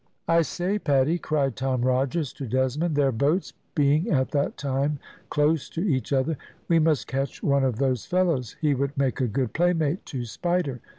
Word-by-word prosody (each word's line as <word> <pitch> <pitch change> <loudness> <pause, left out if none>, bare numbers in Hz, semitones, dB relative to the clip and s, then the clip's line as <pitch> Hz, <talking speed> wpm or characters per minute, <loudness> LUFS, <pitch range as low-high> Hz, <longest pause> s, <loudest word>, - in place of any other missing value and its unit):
"I 165 0 +4
say, 180 +6 -1
Paddy," 145 +1 +2
cried 140 -7 0
Tom 130 +1 -1
Rogers 130 +3 0
to 135 - -6
Desmond, 130 +7 0
their 140 -2 +3
boats 145 +10 0 0.2
being 150 +2 +3
at 130 -4 +1
that 145 -1 0
time 140 +1 -1 0.3
close 150 0 +1
to 165 - -4
each 145 -10 0
other, 140 +2 +1 0.3
"we 165 -1 +4
must 155 -3 +2
catch 135 +1 -3
one 140 -2 +3
of 130 -4 0
those 130 -3 0
fellows; 170 - 0
he 150 -2 +2
would 140 +1 -2
make 135 -1 0
a 125 - +2
good 120 +2 -1
playmate 170 -1 +1
to 125 -4 -4
Spider. 155 -1 -2
140 Hz, 180 wpm, -25 LUFS, 130-160 Hz, 0.3 s, I